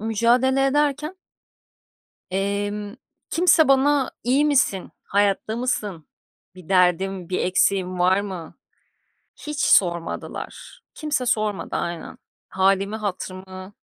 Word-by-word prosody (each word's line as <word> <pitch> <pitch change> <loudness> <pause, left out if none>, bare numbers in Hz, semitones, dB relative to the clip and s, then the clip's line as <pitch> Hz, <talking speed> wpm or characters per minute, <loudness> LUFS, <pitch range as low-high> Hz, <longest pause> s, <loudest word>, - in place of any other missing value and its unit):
mücadele 240 +5 +2
ederken 295 +4 0 1.2
emm, 205 +2 -2 0.3
kimse 330 -2 +4
bana, 275 0 +3
"İyi 270 +5 +3
misin, 270 -10 +1
hayatta 205 +2 0
mısın, 210 - -3 0.5
bir 185 -2 -14
derdin, 185 0 +2
bir 185 - -1
eksiğin 185 0 +1
var 185 +2 +3
mı?" 185 -5 -7 0.9
hiç 300 -1 -4
sormadılar. 170 -3 0
Kimse 295 -5 -2
sormadı, 215 -4 -1
aynen, 170 -1 -5 0.3
hâlimi 195 +2 +1
hatırımı 185 -2 -6
205 Hz, 95 wpm, -23 LUFS, 185-260 Hz, 1.2 s, kimse